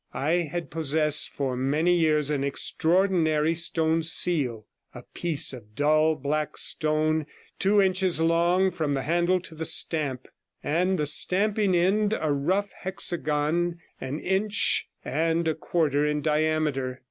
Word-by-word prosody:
I 160 Hz, +3 st, 0 dB
had 175 Hz, +2 st, -5 dB
possessed 155 Hz, -1 st, +1 dB
for 135 Hz, -3 st, -3 dB
many 150 Hz, +7 st, +1 dB
years 155 Hz, -3 st, +1 dB
an 140 Hz, -2 st, -1 dB
extraordinary 160 Hz, +1 st, +1 dB
stone 165 Hz, -1 st, +1 dB
seal 145 Hz, -9 st, +1 dB
— -, -, -35 dB
a -, -, -9 dB
piece 160 Hz, -6 st, +1 dB
of 105 Hz, -4 st, -12 dB
dull 155 Hz, +3 st, +2 dB
black 150 Hz, +1 st, -3 dB
stone, 155 Hz, 0 st, +1 dB, 0.3 s
two 205 Hz, +2 st, +3 dB
inches 185 Hz, -3 st, +1 dB
long 170 Hz, +3 st, +2 dB
from 155 Hz, -5 st, -2 dB
the 135 Hz, -1 st, -2 dB
handle 175 Hz, +4 st, +1 dB
to 170 Hz, -, -10 dB
the 160 Hz, +1 st, -6 dB
stamp, 145 Hz, -5 st, 0 dB, 0.4 s
and 180 Hz, +5 st, 0 dB
the 150 Hz, -, -1 dB
stamping 200 Hz, +5 st, +2 dB
end 205 Hz, +5 st, +1 dB
a 155 Hz, -1 st, -1 dB
rough 185 Hz, +8 st, -1 dB
hexagon 175 Hz, -2 st, -1 dB, 0.2 s
an 135 Hz, +4 st, -5 dB
inch 200 Hz, +3 st, 0 dB, 0.2 s
and 165 Hz, +3 st, -1 dB
a 160 Hz, -, +1 dB
quarter 155 Hz, -2 st, -1 dB
in 150 Hz, 0 st, -1 dB
diameter. 150 Hz, -4 st, -1 dB
160 Hz, 140 wpm, -25 LUFS, 150-175 Hz, 0.4 s, two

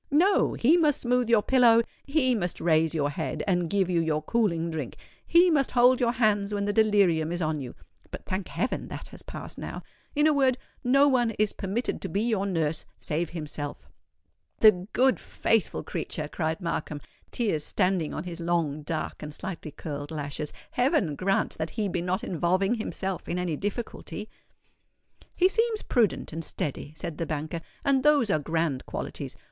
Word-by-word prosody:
No—he 320 Hz, -, +4 dB
must 305 Hz, -4 st, +3 dB
smooth 245 Hz, -1 st, +1 dB
your 225 Hz, -3 st, +5 dB
pillow—he 255 Hz, +3 st, +3 dB
must 180 Hz, -7 st, -2 dB
raise 160 Hz, -1 st, +2 dB
your 145 Hz, -2 st, +1 dB
head, 150 Hz, +2 st, -3 dB
and 175 Hz, -4 st, +1 dB
give 195 Hz, -1 st, +2 dB
you 175 Hz, -2 st, +1 dB
your 155 Hz, -2 st, 0 dB
cooling 170 Hz, -5 st, 0 dB
drink—he 340 Hz, -, +1 dB
must 280 Hz, -4 st, +2 dB
hold 250 Hz, +1 st, +5 dB
your 240 Hz, -2 st, +2 dB
hands 210 Hz, -4 st, +2 dB
when 200 Hz, 0 st, -1 dB
the 205 Hz, -, 0 dB
delirium 200 Hz, -7 st, +3 dB
is 175 Hz, -, -2 dB
on 155 Hz, -2 st, -1 dB
you 125 Hz, -, -7 dB, 0.3 s
(but, -, -, -8 dB
thank 185 Hz, 0 st, -3 dB
heaven! 250 Hz, -, -2 dB
that -, -, -8 dB
has -, -, -10 dB
passed -, -, -7 dB
now);—in 295 Hz, 0 st, -4 dB
a 310 Hz, -, +5 dB
word, 265 Hz, -3 st, +3 dB, 0.3 s
no 275 Hz, +3 st, +5 dB
one 250 Hz, -4 st, +3 dB
is 215 Hz, -1 st, +2 dB
permitted 200 Hz, +6 st, -2 dB
to -, -, -4 dB
be 200 Hz, +2 st, 0 dB
your 215 Hz, -4 st, 0 dB
nurse 165 Hz, -4 st, -1 dB, 0.2 s
save 160 Hz, +2 st, -2 dB
himself." 150 Hz, -3 st, -6 dB, 0.7 s
"The 190 Hz, -4 st, +6 dB
good, 260 Hz, +1 st, +3 dB
faithful 225 Hz, -4 st, 0 dB
creature!" 155 Hz, -2 st, -4 dB
cried 160 Hz, +3 st, -2 dB
Markham, 155 Hz, -3 st, -3 dB, 0.3 s
tears 200 Hz, -11 st, 0 dB
standing 185 Hz, -4 st, 0 dB
on 155 Hz, -, -4 dB
his 175 Hz, -1 st, -7 dB
long, 165 Hz, -3 st, 0 dB
dark, 155 Hz, +1 st, -4 dB
and 150 Hz, -, -6 dB
slightly 165 Hz, +1 st, -6 dB
curled 145 Hz, -1 st, -6 dB
lashes. 150 Hz, -1 st, -4 dB, 0.2 s
"Heaven 245 Hz, -, +2 dB
grant 195 Hz, +2 st, 0 dB
that 160 Hz, 0 st, -2 dB
he 210 Hz, -2 st, +1 dB
be 175 Hz, -2 st, -2 dB
not 185 Hz, +5 st, -1 dB
involving 185 Hz, +2 st, +1 dB
himself 195 Hz, -4 st, -3 dB
in 175 Hz, -, -1 dB
any 180 Hz, -3 st, -1 dB
difficulty." 210 Hz, -, -5 dB, 1.1 s
"He 365 Hz, -, +5 dB
seems 450 Hz, +2 st, +1 dB
prudent 225 Hz, -, +1 dB
and 165 Hz, +1 st, -4 dB
steady," 145 Hz, -1 st, -4 dB
said 155 Hz, 0 st, -5 dB
the 165 Hz, -, -2 dB
banker; 155 Hz, +2 st, -3 dB, 0.2 s
"and 275 Hz, -2 st, +3 dB
those 285 Hz, -7 st, +4 dB
are 155 Hz, -, +2 dB
grand 160 Hz, -3 st, -1 dB
qualities. -, -, -5 dB
190 Hz, 170 wpm, -27 LUFS, 160-240 Hz, 1.1 s, The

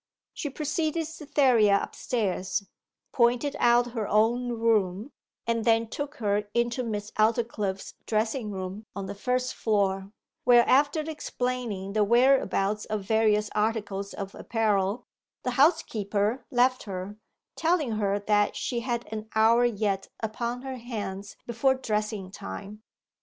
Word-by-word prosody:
She 295 Hz, -, -4 dB
preceded 310 Hz, +3 st, -1 dB
Cytherea 260 Hz, -10 st, +3 dB
upstairs, 200 Hz, -5 st, -2 dB, 0.5 s
pointed 245 Hz, +4 st, +2 dB
out 240 Hz, 0 st, +4 dB
her 225 Hz, -3 st, -3 dB
own 235 Hz, +4 st, +2 dB
room, 220 Hz, 0 st, +1 dB, 0.3 s
and 230 Hz, -1 st, 0 dB
then 230 Hz, 0 st, +3 dB
took 290 Hz, +3 st, -5 dB
her 210 Hz, -4 st, -1 dB
into 235 Hz, +1 st, +1 dB
Miss 210 Hz, -3 st, -4 dB
Aldclyffe's 215 Hz, -3 st, 0 dB
dressing 220 Hz, +1 st, 0 dB
room, 195 Hz, +2 st, -6 dB
on 200 Hz, -1 st, -4 dB
the 195 Hz, -, -5 dB
first 250 Hz, +5 st, -1 dB
floor; 195 Hz, -3 st, 0 dB, 0.3 s
where, 240 Hz, -1 st, +6 dB
after 290 Hz, +4 st, +4 dB
explaining 250 Hz, -9 st, -3 dB
the 215 Hz, 0 st, +3 dB
whereabouts 215 Hz, -3 st, +3 dB
of 215 Hz, -2 st, -3 dB
various 210 Hz, 0 st, +2 dB
articles 210 Hz, -2 st, -1 dB
of 195 Hz, -1 st, -6 dB
apparel, 215 Hz, 0 st, 0 dB, 0.4 s
the 250 Hz, -, -1 dB
housekeeper 235 Hz, -, +1 dB
left 255 Hz, +1 st, +3 dB
her, 195 Hz, +1 st, -6 dB, 0.4 s
telling 320 Hz, -6 st, +1 dB
her 205 Hz, -2 st, 0 dB
that 205 Hz, 0 st, +1 dB
she 240 Hz, -, -2 dB
had 240 Hz, -1 st, -2 dB
an 215 Hz, 0 st, -5 dB
hour 230 Hz, +2 st, +5 dB
yet 205 Hz, -4 st, 0 dB
upon 235 Hz, +3 st, -3 dB
her 265 Hz, -1 st, -5 dB
hands 205 Hz, -5 st, -6 dB
before 240 Hz, +3 st, +2 dB
dressing 210 Hz, -5 st, -2 dB
time. 195 Hz, -, -8 dB
225 Hz, 130 wpm, -27 LUFS, 205-245 Hz, 0.5 s, where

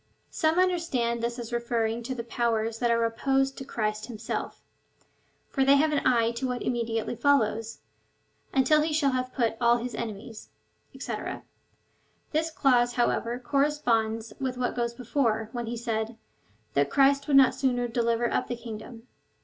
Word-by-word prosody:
Some 315 Hz, +1 st, +1 dB
understand 335 Hz, -11 st, +1 dB
this 235 Hz, +1 st, -2 dB
as 240 Hz, -1 st, -7 dB
referring 235 Hz, -1 st, -1 dB
to 255 Hz, +2 st, -4 dB
the 235 Hz, -, -4 dB
powers 225 Hz, -1 st, -1 dB
that 240 Hz, -, +1 dB
are 230 Hz, 0 st, +2 dB
opposed 270 Hz, +4 st, +1 dB
to -, -, -5 dB
Christ 215 Hz, -4 st, -3 dB
himself; 225 Hz, -2 st, -5 dB, 0.8 s
for 270 Hz, -, 0 dB
they 275 Hz, +1 st, +6 dB
have 305 Hz, +2 st, +3 dB
an 295 Hz, -, +1 dB
eye 230 Hz, -2 st, +3 dB
to 260 Hz, -, -1 dB
what 250 Hz, -1 st, -3 dB
immediately 230 Hz, -1 st, -1 dB
follows, 225 Hz, -5 st, +1 dB, 0.7 s
until 305 Hz, +3 st, +4 dB
he 310 Hz, 0 st, -1 dB
shall 285 Hz, -3 st, +2 dB
have 255 Hz, 0 st, -2 dB
put 230 Hz, -3 st, 0 dB
all 235 Hz, 0 st, +5 dB
his 240 Hz, 0 st, -5 dB
enemies, 220 Hz, -1 st, -7 dB, 0.5 s
&c. -, -, -4 dB, 1.2 s
This 320 Hz, +1 st, 0 dB
clause, 245 Hz, -6 st, +2 dB
how^ever, 240 Hz, 0 st, 0 dB
corresponds 235 Hz, -7 st, 0 dB
with 260 Hz, -2 st, -2 dB
what 250 Hz, -1 st, -1 dB
goes 235 Hz, -1 st, -1 dB
before, 230 Hz, -3 st, 0 dB
when 240 Hz, -2 st, -4 dB
he 235 Hz, +1 st, -3 dB
said, 225 Hz, -1 st, -3 dB, 0.6 s
that 140 Hz, 0 st, +2 dB
Christ 275 Hz, +1 st, +3 dB
would 280 Hz, -2 st, +5 dB
not 265 Hz, -1 st, +6 dB
sooner 245 Hz, -2 st, 0 dB
deliver 235 Hz, 0 st, +1 dB
up -, -, 0 dB
the 245 Hz, -, -3 dB
kingdom. 230 Hz, 0 st, -9 dB
240 Hz, 160 wpm, -27 LUFS, 230-270 Hz, 1.2 s, they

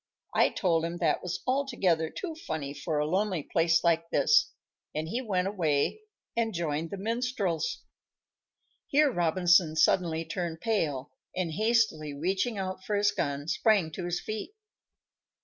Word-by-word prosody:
I -, -, +4 dB
told 165 Hz, -5 st, +1 dB
him 170 Hz, +1 st, -3 dB
that 170 Hz, -, +1 dB
was 180 Hz, 0 st, -4 dB
altogether 240 Hz, -, +1 dB
too 345 Hz, -, -5 dB
funny 160 Hz, -, -5 dB
for 150 Hz, +2 st, -3 dB
a 150 Hz, -, +1 dB
lonely 185 Hz, 0 st, 0 dB
place 165 Hz, +1 st, +2 dB
like 165 Hz, -1 st, +2 dB
this, 460 Hz, -, +4 dB, 0.4 s
and 155 Hz, +1 st, -2 dB
he 235 Hz, +10 st, -2 dB
went 190 Hz, -6 st, 0 dB
away 165 Hz, -, 0 dB, 0.4 s
and 225 Hz, -3 st, 0 dB
joined 165 Hz, -1 st, -2 dB
the 200 Hz, -, -5 dB
minstrels." 220 Hz, -5 st, -1 dB, 1.0 s
Here 290 Hz, 0 st, +4 dB
Robinson 175 Hz, -2 st, +3 dB
suddenly 165 Hz, 0 st, +2 dB
turned 165 Hz, 0 st, -4 dB
pale, 150 Hz, -, -1 dB, 0.2 s
and, 180 Hz, -3 st, -1 dB
hastily 210 Hz, -7 st, +1 dB
reaching 190 Hz, -, -1 dB
out 185 Hz, -1 st, -4 dB
for 210 Hz, -, -1 dB
his 205 Hz, 0 st, +3 dB
gun, 140 Hz, +1 st, -2 dB
sprang 190 Hz, -1 st, +2 dB
to 175 Hz, +3 st, -5 dB
his 175 Hz, 0 st, -1 dB
feet. 215 Hz, -, -5 dB
175 Hz, 150 wpm, -29 LUFS, 160-210 Hz, 1.0 s, I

